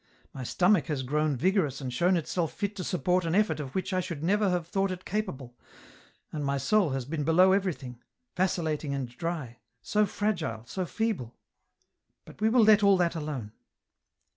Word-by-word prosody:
" -, -, -34 dB
My 130 Hz, -, -6 dB
stomach 180 Hz, -, +2 dB
has 145 Hz, -4 st, -2 dB
grown 150 Hz, +1 st, 0 dB
vigorous 165 Hz, -, +1 dB
and 130 Hz, -3 st, -5 dB
shown 175 Hz, +8 st, +3 dB
itself 165 Hz, 0 st, -2 dB
fit 200 Hz, 0 st, -3 dB
to 185 Hz, -, -3 dB
support 180 Hz, +1 st, +1 dB
an 165 Hz, +1 st, -1 dB
effort 205 Hz, -7 st, +2 dB
of 135 Hz, -3 st, -6 dB
which 190 Hz, 0 st, -2 dB
I 185 Hz, -, +2 dB
should 170 Hz, -5 st, -5 dB
never 205 Hz, +3 st, +2 dB
have 175 Hz, -2 st, -1 dB
thought 195 Hz, +2 st, 0 dB
it 185 Hz, 0 st, -6 dB
capable, 145 Hz, -, -4 dB, 0.8 s
and 150 Hz, -2 st, -4 dB
my 140 Hz, 0 st, 0 dB
soul 205 Hz, +4 st, +2 dB
has 135 Hz, -2 st, -3 dB
been 150 Hz, +2 st, -3 dB
below 175 Hz, +5 st, +5 dB
everything, 155 Hz, -11 st, -1 dB, 0.3 s
vacillating 160 Hz, -5 st, -1 dB
and 135 Hz, -2 st, -3 dB
dry, 145 Hz, -7 st, -4 dB, 0.2 s
so 210 Hz, 0 st, +2 dB
fragile, 170 Hz, -, -2 dB
so 185 Hz, +8 st, -4 dB
feeble! 200 Hz, -, -2 dB, 0.4 s
" -, -, -49 dB
But -, -, -15 dB
we 220 Hz, -, +4 dB
will 235 Hz, 0 st, +5 dB
let 215 Hz, -1 st, +6 dB
all 200 Hz, -1 st, +5 dB
that 175 Hz, -2 st, +1 dB
alone." 150 Hz, -9 st, -5 dB
170 Hz, 190 wpm, -28 LUFS, 140-190 Hz, 0.8 s, let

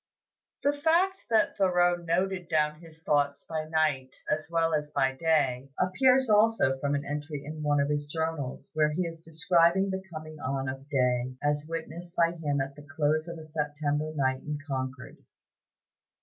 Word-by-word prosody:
The 285 Hz, -, +3 dB
fact 340 Hz, +6 st, +2 dB
that 220 Hz, -2 st, +3 dB
Thoreau 180 Hz, -2 st, +3 dB
noted 175 Hz, +1 st, -1 dB
down 150 Hz, -1 st, +1 dB
his 160 Hz, -1 st, -15 dB
thoughts 145 Hz, -2 st, +1 dB
by 160 Hz, -1 st, -3 dB
night 155 Hz, -5 st, 0 dB, 0.2 s
as 155 Hz, 0 st, -1 dB
well 165 Hz, -1 st, +1 dB
as 150 Hz, -1 st, 0 dB
by 135 Hz, -2 st, +1 dB
day, 135 Hz, -3 st, +1 dB
appears 255 Hz, +8 st, +4 dB
also 210 Hz, -11 st, +4 dB
from 145 Hz, +1 st, 0 dB
an 140 Hz, -, -2 dB
entry 145 Hz, 0 st, -5 dB
in 155 Hz, +1 st, -6 dB
one 145 Hz, -1 st, +2 dB
of 140 Hz, -, +2 dB
his 145 Hz, 0 st, -1 dB
journals, 155 Hz, -4 st, -3 dB
where 155 Hz, -1 st, +2 dB
he 180 Hz, +4 st, 0 dB
is 165 Hz, -1 st, -6 dB
describing 170 Hz, +3 st, +3 dB
the 190 Hz, 0 st, -2 dB
coming 155 Hz, -1 st, -8 dB
on 135 Hz, 0 st, -2 dB
of 135 Hz, +2 st, -6 dB
day, 125 Hz, -2 st, +1 dB
as 145 Hz, +1 st, 0 dB
witnessed 165 Hz, +1 st, -6 dB
by 170 Hz, 0 st, +3 dB
him 150 Hz, -4 st, -2 dB
at 135 Hz, +1 st, -4 dB
the 145 Hz, -, -11 dB
close 155 Hz, +1 st, +1 dB
of 170 Hz, 0 st, -6 dB
a 160 Hz, -, -9 dB
September 150 Hz, 0 st, -2 dB
night 130 Hz, -2 st, +1 dB
in 150 Hz, -1 st, -4 dB
Concord. 130 Hz, -2 st, -4 dB
155 Hz, 175 wpm, -29 LUFS, 145-170 Hz, 0.2 s, appears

